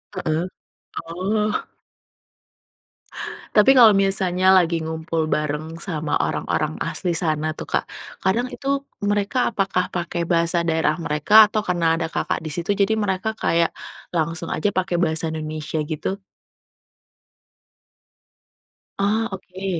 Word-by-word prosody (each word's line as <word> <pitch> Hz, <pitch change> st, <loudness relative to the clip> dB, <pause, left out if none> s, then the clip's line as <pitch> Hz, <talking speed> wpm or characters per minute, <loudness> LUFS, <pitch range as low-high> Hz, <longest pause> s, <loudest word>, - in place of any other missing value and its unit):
Heeh, 165 Hz, -1 st, -1 dB, 0.6 s
oh. 200 Hz, +5 st, -1 dB, 1.9 s
Tapi 210 Hz, +5 st, +7 dB
kalau 225 Hz, -6 st, +7 dB
misalnya 190 Hz, -1 st, +3 dB
lagi 170 Hz, -3 st, +4 dB
ngumpul 160 Hz, 0 st, -2 dB
bareng 150 Hz, +2 st, -2 dB
sama 160 Hz, -5 st, -3 dB
orang-orang -, -, -1 dB
asli 175 Hz, -2 st, -2 dB
sana 155 Hz, -2 st, 0 dB
tuh -, -, -6 dB
Kak, -, -, -1 dB, 0.4 s
kadang 215 Hz, +7 st, +1 dB
itu, 275 Hz, 0 st, -2 dB, 0.2 s
mereka 205 Hz, +4 st, +1 dB
apakah 195 Hz, -4 st, 0 dB
pakai 175 Hz, -1 st, -3 dB
bahasa 170 Hz, 0 st, +2 dB
daerah 160 Hz, -1 st, +1 dB
mereka, 185 Hz, +8 st, +6 dB
atau 215 Hz, 0 st, -1 dB
karena 170 Hz, -2 st, +1 dB
ada 165 Hz, -, -1 dB
Kakak -, -, -2 dB
di -, -, -3 dB
situ, 175 Hz, +3 st, -5 dB
jadi 200 Hz, +2 st, +2 dB
mereka 205 Hz, 0 st, -1 dB
kayak 170 Hz, -5 st, +1 dB, 0.4 s
langsung 165 Hz, 0 st, -1 dB
aja 180 Hz, -, 0 dB
pakai 185 Hz, -2 st, -1 dB
bahasa 160 Hz, -1 st, 0 dB
Indonesia 155 Hz, 0 st, -3 dB
gitu? 155 Hz, +6 st, -4 dB, 2.8 s
Oh 215 Hz, +3 st, +1 dB
oke. 190 Hz, -1 st, -4 dB
175 Hz, 120 wpm, -22 LUFS, 160-200 Hz, 2.8 s, Tapi